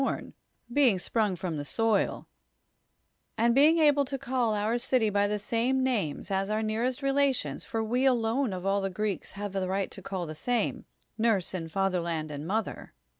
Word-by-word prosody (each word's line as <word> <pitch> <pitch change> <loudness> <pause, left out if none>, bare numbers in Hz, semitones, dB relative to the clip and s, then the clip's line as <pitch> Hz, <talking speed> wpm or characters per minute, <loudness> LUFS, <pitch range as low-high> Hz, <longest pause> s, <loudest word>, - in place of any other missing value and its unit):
rn, - - -3 0.4
being 255 -8 +4
sprinig 205 0 0
from 170 -4 -3
the 145 - -3
soil, 220 +6 0 1.1
and 235 +1 +3
l)eing 305 +4 +6
able 290 -2 +5
to 275 0 -4
call 250 -4 0
our 215 +3 0
cily 240 -3 +2
by 205 0 +2
the 210 +1 -1
snine 240 +5 0
naitH'S 205 - -1
as 195 +1 0
our 215 +1 0
neart'st 240 +5 -1
relations, 275 -1 0
luv 225 -2 -1
v,e 250 +4 +1
jiloiie 245 0 +2
of 180 - -7
all 200 +1 +2
tlie 195 -1 -3
(iriM 210 -2 -1
ks - - -11
have 200 0 -5
a - - +1
riuht 190 +1 -1
to 195 - -8
c;;ll 185 -1 -4
the 155 - -6
snnic 230 +7 -1 0.2
— - - -47
nurse 220 -6 +1
and 165 -3 -5
fatherland 170 -4 -1
and 145 +2 -6
mother. 220 +4 -3
215 Hz, 190 wpm, -28 LUFS, 195-250 Hz, 1.1 s, l)eing